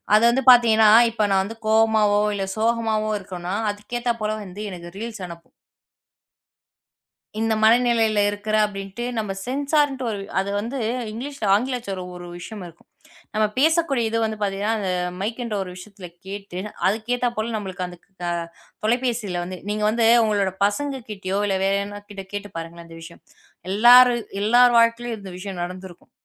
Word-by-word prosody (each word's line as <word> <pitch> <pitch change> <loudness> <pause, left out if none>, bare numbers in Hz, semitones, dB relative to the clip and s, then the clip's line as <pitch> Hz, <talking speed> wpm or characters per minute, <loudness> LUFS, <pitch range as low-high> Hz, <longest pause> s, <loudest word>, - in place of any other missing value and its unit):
அது 215 - +4
வந்து 260 +3 +1
பாத்தீங்கன்னா, 225 -3 +6 0.2
இப்ப 215 -2 0
நான் 190 0 +3
வந்து 225 +3 -8
கோபமாவோ, 220 -2 +3
இல்ல 195 -1 -2
சோகமாவோ 220 -1 0
இருக்கோம்னா 185 -1 -5 0.2
அதுக்கு 205 +4 -6
ஏத்தா 240 0 0
போல 215 0 0
வந்து 195 +2 -9
எனக்கு 175 -1 -8
ரீல்ஸ் 225 -2 -6
அனுப்பும். 170 -1 -12 1.9
இந்த 225 0 +1
மனநிலையில 225 -2 +4
இருக்குறா 215 +1 -1
அப்படின்ட்டு 195 +3 -7
நம்ம 210 -2 -2 0.2
சென்சார்ன்டு 280 0 0
ஒரு 205 -2 -4 0.2
அது 195 +1 -3
வந்து 235 +6 -5 0.3
இங்கிலீஷ்ல 270 0 -5
ஆங்கிலச்சொல் 235 -4 -2 0.2
ஒரு 175 0 -9
விஷயம் 205 +3 -8
இருக்கும். 170 -1 -17 0.5
நம்ம 215 0 +3
பேசக்கூடிய 315 -3 +2
இது 230 - 0
வந்து 220 0 -2
பாத்தீங்கன்னா, 200 +2 -1
அந்த 200 -3 -3 0.3
மைக்குன்ற 230 +2 -3
ஒரு 185 - -7
விஷயத்துல 185 0 -11 0.2
கேட்டு, 195 -2 -7 0.3
அதுக்கு 220 +4 0
ஏத்தா 245 0 0
போல 220 +2 -2
நமக்கு 190 -3 -5
அந்தக் 175 -1 -13 0.2
க - - -2 0.6
தொலைபேசியில 230 -5 0
வந்து 185 +1 -7
நீங்க 210 0 -2
வந்து 225 0 +2 0.2
உங்களோட 200 -3 +1
பசங்க 270 +6 -1
கிட்டயோ 195 -1 -3
இல்ல 195 -1 0
வேற 195 0 +2
யாரானா 205 +1 -6
கிட்டே 195 -2 -8
கேட்டுப் 205 -3 -6
பாருங்களேன், 165 +1 -7
அந்த 165 - -12
விஷயம். 170 +1 -12 0.5
எல்லாரு 245 +4 +7 0.3
எல்லார் 240 +3 +5
வாழ்க்கையிலும் 230 0 +2
இந்த 195 -2 -9
விஷயம் 190 -1 -6
நடந்துருக்கும். 180 0 -8
215 Hz, 155 wpm, -23 LUFS, 195-235 Hz, 1.9 s, எல்லாரு